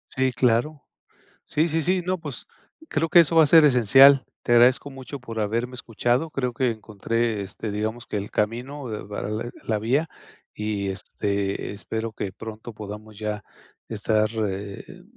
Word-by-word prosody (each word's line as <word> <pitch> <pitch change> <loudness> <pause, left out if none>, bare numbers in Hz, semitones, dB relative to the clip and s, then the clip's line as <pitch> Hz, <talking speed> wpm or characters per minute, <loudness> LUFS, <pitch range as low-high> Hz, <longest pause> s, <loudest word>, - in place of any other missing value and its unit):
Sí, 130 0 +2
claro. 125 +5 +1 0.6
Sí, 160 +3 +1
sí, 160 +1 +1
sí, 180 +4 +1
no, 185 +1 0
pues, 145 -7 -8 0.4
creo 160 +1 0
que 175 - +7
eso 165 0 +4
va 160 - +8
a - - +5
ser 160 +2 +7
esencial. 135 +1 +7 0.2
Te 120 - +1
agradezco 125 +4 +5
mucho 135 +1 -8
por 115 -3 -6
haberme 115 +4 -1
escuchado. 120 +5 -1
Creo 125 -4 -2
que 125 +1 +1
encontré, 110 0 -2
este, 100 +2 -5
digamos 110 +3 -3
que - - -3
el 100 0 -5
camino 125 +5 -2
de 105 -1 -5
para 105 0 -4
de 110 +2 -3
a - - -11
la 110 -2 0
vía. 130 +9 +1 0.5
Y, 105 -2 -2
este, 100 +1 -3
espero 110 +2 -4
que 100 -2 -5
pronto 110 +3 -9
podamos 105 0 -9
ya 105 -1 -3 0.4
estar, 110 0 +1 0.2
eh, 100 - -7
115 Hz, 170 wpm, -24 LUFS, 105-135 Hz, 0.6 s, va